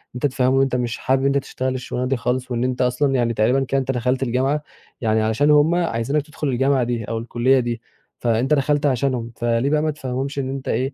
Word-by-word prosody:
أنت 125 - -2
تفهِّمهم 130 -1 +2
إن 135 - +4
أنت 135 -2 +1
مش 120 -1 -2
حابب 130 0 +1
إن - - -1
أنت 140 0 +2
تشتغل 130 -1 -3
الشغلانة 125 0 -3
دي 135 0 0
خالص 125 +1 -2
وإن 120 0 0
أنت 125 0 -1
أصلًا 130 +2 +1
يعني 120 -2 +1
تقريبًا 125 +5 +2
كده 135 +1 0
أنت 135 0 -1
دخَلت 125 +1 0
الجامعة 135 +4 0 0.4
يعني 110 -1 +2
علشان 110 +7 +2
هُم 150 +3 +4
عايزينك 145 -4 0
تدخُل 150 0 -5
الجامعة 135 +1 +2
دي 120 -1 -2
أو 115 - -3
الكُلّية 120 +3 +2
دي، 120 -2 -3 0.4
فأنت 120 +4 +2
دخَلت 145 +1 +1
عشانهم، 125 -3 0
فليه 120 +3 0
بقى 150 0 +2
ما 155 0 0
تفهِّمهمش 135 -1 -4
إن 130 -1 -2
أنت 135 0 -5
إيه، 135 +2 -1
130 Hz, 225 wpm, -21 LUFS, 120-140 Hz, 0.4 s, إن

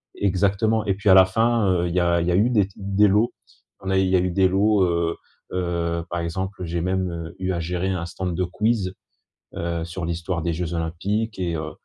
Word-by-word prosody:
exactement, 100 +3 +1
et 95 - +1
puis 100 +1 0
à - - +9
la 95 0 +8
fin, 115 +3 +1
heu, 90 -1 +1
il 85 - -3
y - - +4
a 85 -1 +2
il 85 - -1
y - - +2
a - - +2
eu 105 +6 +3
des 105 -6 +2
t 95 - -20
des 100 +1 +2
lots, 105 +4 +2 0.5
on 95 - -5
a 95 - +2
il 95 - +2
y 95 - +2
a - - +5
eu 90 0 0
des 95 +1 +3
lots, 100 +2 +3
heu 85 -1 0 0.4
heu, 85 -2 -1
par 85 - -2
exemple 95 +3 -4
j'ai 85 0 -2
même, 95 +1 0
heu, 85 -1 -6
eu 95 0 -1
à 85 - -2
gérer 90 +3 -2
un 90 -2 -2
stand 90 +1 -4
de 90 - 0
quiz, 100 +1 0 0.6
heu, 85 -1 -2
sur 85 +1 -5
l'histoire 85 +1 -3
des 85 0 0
jeux 85 +1 -3
olympiques 95 +7 -2
et, 85 -2 -1
heu 80 0 -5
90 Hz, 245 wpm, -23 LUFS, 85-100 Hz, 0.6 s, à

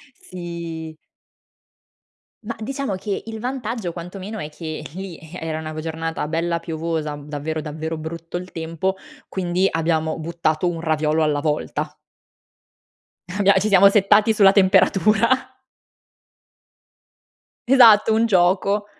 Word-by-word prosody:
Sì. 170 -3 -7 1.5
Mah, 225 +2 -5
diciamo 265 -1 -3
che, 195 +1 -4
il 225 0 -6
vantaggio, 235 -6 -3
quantomeno, 185 +5 -7
è 150 - -4
che 155 0 -6
lì, 190 -2 -7
eh, 165 +2 -10
era 160 -1 -3
una 155 0 -6
v 155 - -5
giornata 165 0 -3
bella 170 +1 -1
piovosa, 160 -2 -3
v 145 - -12
davvero, 155 +1 -3
davvero 160 +1 -5
brutto 165 +2 -6
il 180 +1 -9
tempo, 165 +4 -2 0.3
quindi, 185 0 0
abbiamo 160 -1 0
buttato 160 0 -1
1 170 -1 -4
raviolo 155 -1 +1
alla 150 -2 +1
volta. 150 0 -2 1.3
Abbia 200 +2 +3
ci 210 - 0
siamo 200 -1 +7
settati 210 +2 +4
sulla 200 -3 +6
temperatura. 195 +2 +4 2.4
Esatto, 225 -4 +7
un 225 +1 +3
gioco. 195 +1 +2
175 Hz, 125 wpm, -21 LUFS, 160-200 Hz, 2.4 s, siamo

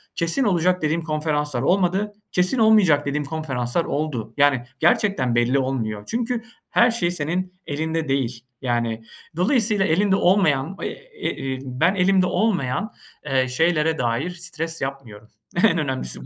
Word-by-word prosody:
kesin 170 +11 +1
olacak 180 -3 +2
dediğim 155 +2 0
konferanslar 150 -4 -1
olmadı, 190 +5 +1 0.2
kesin 180 +8 +2
olmayacak 200 -10 +5
dediğim 145 +1 -2
konferanslar 140 -1 -2
oldu." 130 -7 -3
Yani 140 -4 +3 0.2
gerçekten 170 - +2
belli 120 +3 +2
olmuyor 115 -6 -2
çünkü 235 0 -2 0.3
her 240 0 +4
şey 180 -7 0
senin 180 +3 -2
elinde 160 +1 -2
değil. 125 -3 -1 0.2
Yani, 115 -3 -1 0.3
dolayısıyla 210 -1 +2
elinde 190 +4 +2
olmayan, 175 -4 +2
e 450 -4 -5
iii, 130 -1 -4
ben 140 +9 +1
elimde 185 0 +3
olmayan, 200 - 0 0.4
ııı, 130 -1 +2
şeylere 160 +3 +1
dair 120 +7 -1
stres 165 -2 -5
yapmıyorum. 130 -6 -6 0.4
En 205 -6 +5
önemlisi 130 - -2
bu. - - -11
160 Hz, 135 wpm, -22 LUFS, 130-185 Hz, 0.4 s, olmayacak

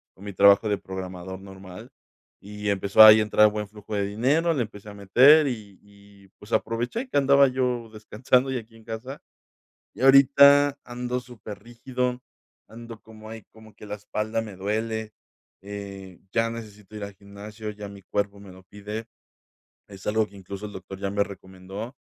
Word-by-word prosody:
con 95 - -16
mi 100 - -6
trabajo 100 +3 +5
de 105 - +1
programador 95 -1 -7
normal, 95 -1 -12 0.5
y 105 +1 -5
empezó 100 +1 +3
ahí 110 0 +10
a - - +2
entrar 105 0 +4
buen 105 0 -4
flujo 105 0 -8
de 100 -1 0
dinero, 140 +12 +1
le 140 - -1
empecé 105 -1 -11
a 105 - -10
meter, 130 +10 +6
y 105 -6 -6
y, 100 -1 -20
pues, 105 +3 -11
aproveché 120 - -2
que - - -1
andaba 140 0 +5
yo 125 -3 -2
descansando 125 +5 0
y 130 - -1
aquí 115 -1 -10
en 110 - -18
casa. 115 +4 -7 0.7
Y - - -12
ahorita 140 +1 +6
ando 125 +1 -4
súper 115 -5 -11
rígido, 125 +1 -4 0.5
ando 115 0 -11
como 110 -1 -14
ahí 110 -1 -9
como 110 -2 -17
que 105 - -14
la 105 0 -5
espalda 105 +2 -3
me 105 -4 -9
duele, 110 +2 -3 0.5
eh, 100 -2 -9
ya 115 0 +1
necesito 110 -2 -10
ir 105 - -5
al 100 0 -9
gimnasio, 105 +2 -10
ya 105 -1 -9
mi 100 -1 -12
cuerpo 100 +1 -3
me 100 -2 -13
lo 95 +1 -15
pide. 105 +3 -7 0.8
Es 100 -2 -13
algo 110 +1 +1
que 100 - -16
incluso 100 +1 -9
el 105 - -10
doctor 95 0 -9
ya 100 0 -3
me 100 +1 +1
recomendó. 95 +4 -9
105 Hz, 180 wpm, -25 LUFS, 100-120 Hz, 0.8 s, ahí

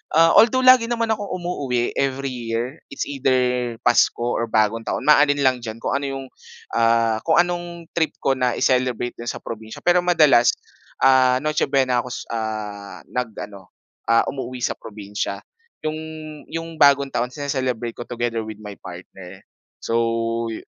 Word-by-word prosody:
ah, 165 +1 +6
although, 255 +3 +4
lagi 255 -2 +7
naman 230 -1 -1
akong 205 -2 -2
umuuwi 145 -11 -2
every 135 0 -1
year. 120 +3 -4
It's - - -3
either 125 -3 0
Pasko 120 0 +3
or 115 -1 -1
Bagong 110 +1 +1
Taon, - - -2
maalin 145 -1 +4
lang 130 -2 +3
diyan 115 -2 -7
kung - - -1
ano 140 - -1
'yong, 135 0 -5 0.5
ah, 115 -1 +2
kung 160 - +4
anong 175 -1 -1
trip 160 -2 0
ko 135 - +3
na 125 -1 +1
i-celebrate 125 -1 +1
diyan 120 - -7
sa - - -6
probinsiya. 110 -1 -8
Pero 175 0 +4
madalas, 155 -9 +4 0.5
ah, 130 -1 +5
Noche 155 0 0
Buena 130 -3 +2
ako, 125 - -10
s - - -5
ah, 110 -3 -5
nag-ano, 105 -5 -6 0.3
ah, 115 0 +4
umuuwi 130 -2 -6
sa - - +1
probinsiya. 105 -2 -5 0.4
'Yong 155 0 -2 0.5
'yong 165 -1 -6
Bagong 140 -1 +5
Taon 120 - 0
sini-celebrate 130 -4 -3
ko 120 - -6
together 120 -1 -2
with 110 -1 -7
my 105 -1 -7
partner. 90 +1 -11 0.4
So, 115 - -1 0.6
yu 110 - -6
125 Hz, 160 wpm, -22 LUFS, 115-150 Hz, 0.6 s, lagi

